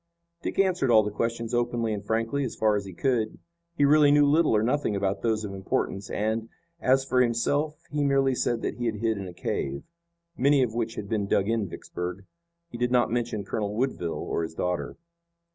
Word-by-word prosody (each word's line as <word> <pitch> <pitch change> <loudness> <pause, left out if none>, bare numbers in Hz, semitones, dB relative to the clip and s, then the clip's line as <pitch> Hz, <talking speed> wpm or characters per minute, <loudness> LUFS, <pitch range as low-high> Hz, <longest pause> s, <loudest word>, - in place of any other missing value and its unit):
Dick - - -4
answered 185 -8 +2
all 110 -2 +6
the 105 - -3
questions 115 +2 -2
openly 120 -2 0
and 105 -1 -4
frankly 115 +6 0
as 125 - -4
far 110 -1 +2
as 100 -1 -2
he 95 - -7
could. 115 0 0 0.4
He 145 - +3
really 150 0 +6
knew 145 0 +6
little 150 -3 +4
or 105 - +3
nothing 125 -2 0
about 100 0 -1
those 110 -2 0
of 100 - -6
importance, 95 0 -2
and, 110 +2 -1 0.3
as 130 +1 +3
for 130 -1 +2
himself, 145 +6 0
he 145 0 0
merely 135 -1 +3
said 120 -1 -1
that - - -2
he 120 -1 -1
had 110 - -1
hid 110 0 -1
in 95 - -5
a 90 - -8
cave, 70 -4 -3 0.5
many 140 -1 +4
of 115 -3 -2
which 115 -1 -2
had 100 - -5
been 105 -2 -1
dug 100 0 +2
in 110 -4 0
Vicksburg. 90 +3 -6 0.5
He 120 - -7
did 125 0 +1
not 125 -2 +3
mention 115 -4 -2
Colonel 105 +1 -2
Woodville 110 -9 -1
or - - -1
his 80 0 -5
daughter. 90 0 -2
115 Hz, 210 wpm, -27 LUFS, 105-130 Hz, 0.5 s, all